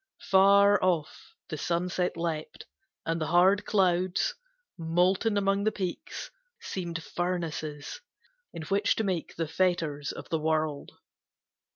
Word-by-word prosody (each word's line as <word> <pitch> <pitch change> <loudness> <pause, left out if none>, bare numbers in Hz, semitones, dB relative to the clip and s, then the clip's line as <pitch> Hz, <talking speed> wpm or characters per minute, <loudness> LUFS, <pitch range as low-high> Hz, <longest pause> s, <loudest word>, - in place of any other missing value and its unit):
Far 200 +1 +6
off 170 -5 -1
the 155 - -4
sunset 180 +2 -1
leapt, 165 -2 -4 0.4
and 165 0 -1
the 155 - -1
hard 185 +5 +4
clouds, 185 - +1 0.4
Molten 180 +6 +1
among 195 0 +1
the 215 - +2
peaks, 185 -4 -5 0.3
seemed 170 -3 -5
furnaces 165 - -4 0.5
In 160 - -7
which 200 +5 +1
to 220 - -1
make 185 -5 -2
the 165 -1 -2
fetters 160 -4 0
of - - -9
the 160 - 0
world. 155 -2 -1
175 Hz, 120 wpm, -28 LUFS, 160-195 Hz, 0.5 s, Far